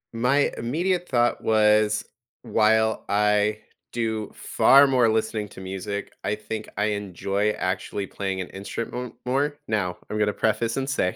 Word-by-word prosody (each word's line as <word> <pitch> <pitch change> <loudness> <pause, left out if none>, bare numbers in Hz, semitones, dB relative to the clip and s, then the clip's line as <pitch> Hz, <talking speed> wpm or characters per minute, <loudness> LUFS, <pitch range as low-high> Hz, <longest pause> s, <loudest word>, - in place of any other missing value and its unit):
My 125 +5 +2
immediate 175 +9 -1
thought 120 -1 +2
was, 105 -1 +3 0.4
while 110 -1 +2
I 105 +1 +2 0.3
do 110 -3 -2
far 140 +1 +5
more 125 -4 +3
listening 110 -1 -1
to - - -11
music, 95 +2 -5
I 105 - 0
think 110 0 -6
I 105 - +2
enjoy 100 0 -1
actually 95 +1 -3
playing 95 0 -4
an 90 - -4
instrument 115 +5 -5
more. 140 +3 0
Now, 100 -5 -1
I'm 105 - -2
gonna 105 -1 +2
preface 115 +3 0
and 135 0 -1
say, 90 -9 0
110 Hz, 145 wpm, -25 LUFS, 105-120 Hz, 0.4 s, far